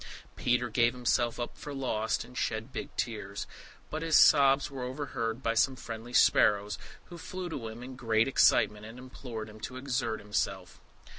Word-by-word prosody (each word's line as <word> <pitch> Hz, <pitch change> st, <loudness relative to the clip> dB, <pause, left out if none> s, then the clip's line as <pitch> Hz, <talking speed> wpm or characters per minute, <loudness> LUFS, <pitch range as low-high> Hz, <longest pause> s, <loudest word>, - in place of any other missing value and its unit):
Peter 125 Hz, 0 st, +1 dB
gave 120 Hz, +1 st, +2 dB
himself 120 Hz, -1 st, 0 dB
up 120 Hz, -, -4 dB
for 145 Hz, -1 st, -7 dB
lost, 110 Hz, -5 st, -1 dB
and 125 Hz, -, -15 dB
shed 110 Hz, +2 st, -2 dB
big -, -, -5 dB
tears; 105 Hz, -4 st, -3 dB, 0.5 s
but 155 Hz, -, -3 dB
his 165 Hz, -1 st, +1 dB
sobs 135 Hz, 0 st, +6 dB
were 135 Hz, -2 st, -6 dB
overheard 125 Hz, -2 st, -3 dB
by 115 Hz, -, +1 dB
some 130 Hz, +3 st, +2 dB
friendly 115 Hz, -1 st, -8 dB
sparrows, 105 Hz, -3 st, +4 dB, 0.3 s
who 175 Hz, -1 st, -9 dB
flew 185 Hz, +1 st, -6 dB
to 130 Hz, -8 st, -5 dB
him 110 Hz, +2 st, -8 dB
in 130 Hz, +1 st, -8 dB
great 115 Hz, -2 st, +2 dB
excitement, 105 Hz, -5 st, +3 dB
and 110 Hz, +3 st, -10 dB
implored 125 Hz, -3 st, -7 dB
him 105 Hz, 0 st, -12 dB
to 125 Hz, -, -6 dB
exert 125 Hz, -4 st, -2 dB
himself. 95 Hz, -3 st, -3 dB
120 Hz, 170 wpm, -30 LUFS, 110-130 Hz, 0.5 s, sobs